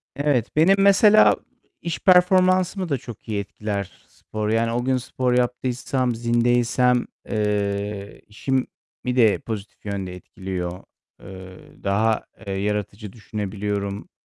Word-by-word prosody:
Evet, 140 -5 0
benim 165 +6 +5
mesela 205 +2 +6 0.5
iş 170 - -3
performansımı 185 0 +4
da 140 - +1
çok 120 -2 -11
iyi 105 -2 -1
etkiler 100 -1 -4 0.2
spor. 105 -1 -5
Yani 115 +1 +1
o 120 +1 -1
gün 130 0 +2
spor 125 0 -1
yaptıysam, 125 0 0
zindeysem, 120 +1 +2 0.2
eee, 100 -1 -2
işimi 130 +5 -1 0.4
de 125 -4 +3
pozitif 105 -3 -7
yönde 95 -3 -4
etkiliyor. 90 -1 -6 0.4
Eee, 95 -1 -12
daha, 105 +3 +1 0.2
eee, 100 - -2
yaratıcı 105 +1 -3
düşünebiliyorum. 105 -2 -4
115 Hz, 115 wpm, -23 LUFS, 100-130 Hz, 0.5 s, mesela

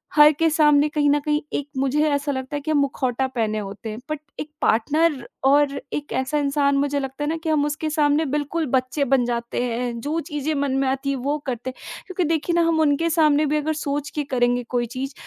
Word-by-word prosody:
हर 300 0 +8
के 325 +2 +2
सामने 295 -1 +4
कहीं 295 -1 +1
न 295 - +3
कहीं 300 0 +1
एक 285 - -2
मुझे 280 +3 +2
ऐसा 285 0 0
लगता 260 +2 -4
है 290 - -3
कि 310 - -3
हम 300 - +3
मुखौटा 265 -2 0
पहने 220 -4 -1
होते 205 +2 -7
हैं 215 +2 -6
बट 305 -1 -2 0.2
एक 305 - -5
पार्टनर 285 +3 +1 0.2
और 280 +1 +4 0.2
एक 290 0 -4
ऐसा 270 +3 -2
इंसान 280 0 +1
मुझे 285 0 0
लगता 270 +2 -5
है - - -1
ना 325 - -1
कि 320 - -2
हम 295 -2 +2
उसके 300 +1 -2
सामने 300 0 +2
बिल्कुल 305 +2 -1
बच्चे 255 +3 0
बन 250 -2 +4
जाते 235 0 -2
हैं 240 0 -2
जो 310 +5 -1
चीज़ें 295 +1 -2
मन 280 -2 0
में - - 0
आती 270 +1 -2
है - - -1
वो 295 +1 +1
करते 250 0 -3
हैं। - - -11
क्योंकि 370 -1 -1
देखिए 320 +2 -1
ना 340 - +4
हम 320 -1 +2
उनके 310 +2 +2
सामने 305 -2 +3
भी 300 +1 +1
अगर 310 +1 -1
सोच 285 +1 -2
के 295 - 0
करेंगे 245 0 +2
कोई 240 0 +2
चीज़ 270 +1 -3
285 Hz, 230 wpm, -23 LUFS, 260-300 Hz, 0.2 s, हर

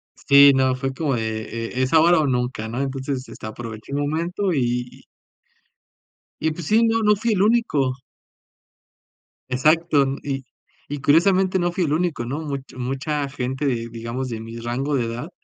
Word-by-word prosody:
Sí, 140 0 +7
no, 130 -1 +2
fue 135 0 -3
como 140 -3 -1
de: 110 -1 -2 0.3
"E 130 - -1
es 130 - -1
ahora 165 +1 +6
o 150 - +1
nunca", 125 -3 -1
¿no?, 125 +4 -3
entonces, 135 -1 -3
este, - - -10
aproveché 110 +2 -8
el 140 - -1
momento 170 +6 -1
y 125 -2 0
y - - -18 1.4
y 160 0 +1
pues 160 0 -7
sí, 225 +2 +4
no, 225 0 +2
no 210 0 +5
fui 225 +2 0
el 190 - +1
único. 205 - +2 1.6
Exacto, 150 +2 +3 0.2
y 135 -2 -4 0.4
y 145 -1 -4
curiosamente 185 +6 +3
no 175 0 0
fui 175 -1 0
el 150 - 0
único, 160 -7 -1
¿no?, 140 +6 -3
mucho 140 -4 -6
mucha 135 +3 -2
gente, 135 +1 -3
de 115 -3 -1
digamos, 115 +3 -5
de 115 -1 -4
mi 115 +1 -8
rango 130 +5 -2
de 120 -3 0
edad, 120 +8 -5
140 Hz, 175 wpm, -22 LUFS, 125-160 Hz, 1.6 s, Sí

